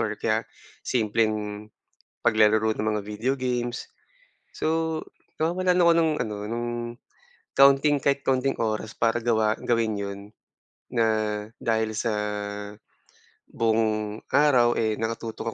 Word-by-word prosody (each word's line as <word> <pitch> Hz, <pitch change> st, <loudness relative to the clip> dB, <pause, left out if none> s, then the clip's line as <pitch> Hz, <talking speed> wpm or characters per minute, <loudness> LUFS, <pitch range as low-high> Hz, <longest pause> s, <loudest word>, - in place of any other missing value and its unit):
or 110 Hz, -2 st, -1 dB
kaya 110 Hz, 0 st, +1 dB, 0.4 s
simpleng 105 Hz, -2 st, 0 dB, 0.6 s
paglalaro 110 Hz, -1 st, +4 dB
ng 110 Hz, +1 st, -1 dB
mga 105 Hz, -, -1 dB
video 110 Hz, +5 st, -1 dB
games. 120 Hz, -1 st, -2 dB, 0.7 s
So 160 Hz, 0 st, -1 dB, 0.4 s
nawawalan 180 Hz, +2 st, +2 dB
ako 170 Hz, 0 st, +6 dB
ng 160 Hz, -1 st, +3 dB
ano 105 Hz, -1 st, -4 dB
ng 120 Hz, +2 st, -3 dB, 0.9 s
kaunting 140 Hz, +2 st, +6 dB
kahit 140 Hz, +1 st, 0 dB
kaunting 135 Hz, +1 st, +1 dB
oras 110 Hz, -1 st, -2 dB
para 115 Hz, 0 st, +2 dB
gawa 110 Hz, -2 st, +1 dB
gawin 115 Hz, -3 st, 0 dB
'yon. 100 Hz, 0 st, -5 dB, 0.7 s
Na 115 Hz, -2 st, +2 dB, 0.5 s
dahil 110 Hz, -1 st, 0 dB
sa 115 Hz, +1 st, 0 dB, 1.4 s
buong 110 Hz, -1 st, 0 dB
araw, 130 Hz, -4 st, +4 dB
eh, 110 Hz, -1 st, +1 dB
naka 115 Hz, 0 st, -1 dB
tutok 115 Hz, -1 st, -5 dB
115 Hz, 115 wpm, -25 LUFS, 110-135 Hz, 1.4 s, ako